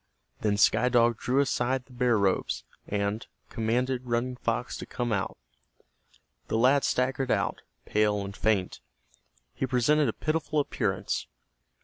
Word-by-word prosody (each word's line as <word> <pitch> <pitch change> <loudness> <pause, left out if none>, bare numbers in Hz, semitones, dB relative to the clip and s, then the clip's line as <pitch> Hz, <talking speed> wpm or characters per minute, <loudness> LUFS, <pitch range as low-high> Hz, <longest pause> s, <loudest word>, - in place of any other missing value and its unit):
Then 105 -1 +1
Sky 125 +4 +4
Dog 120 -2 +3
drew 130 +3 +2
aside 130 -1 0
the 130 - -18
bear 120 -2 +2
robes, 100 -2 0 0.2
and 100 +2 -2 0.2
commanded 125 +3 -1
Running 120 +2 0
Fox - - -2
to - - -7
come 120 -2 -2
out. 95 -2 -2 1.1
The - - 0
lad 130 +4 +4
staggered 130 +1 0
out, 100 -5 0 0.2
pale 105 -1 +1
and 100 +1 -7
faint. 100 -4 0 0.7
He 130 - -2
presented 130 +3 +3
a - - -2
pitiful 155 -1 -1
appearance. 105 -9 -1
120 Hz, 135 wpm, -28 LUFS, 105-130 Hz, 1.1 s, Sky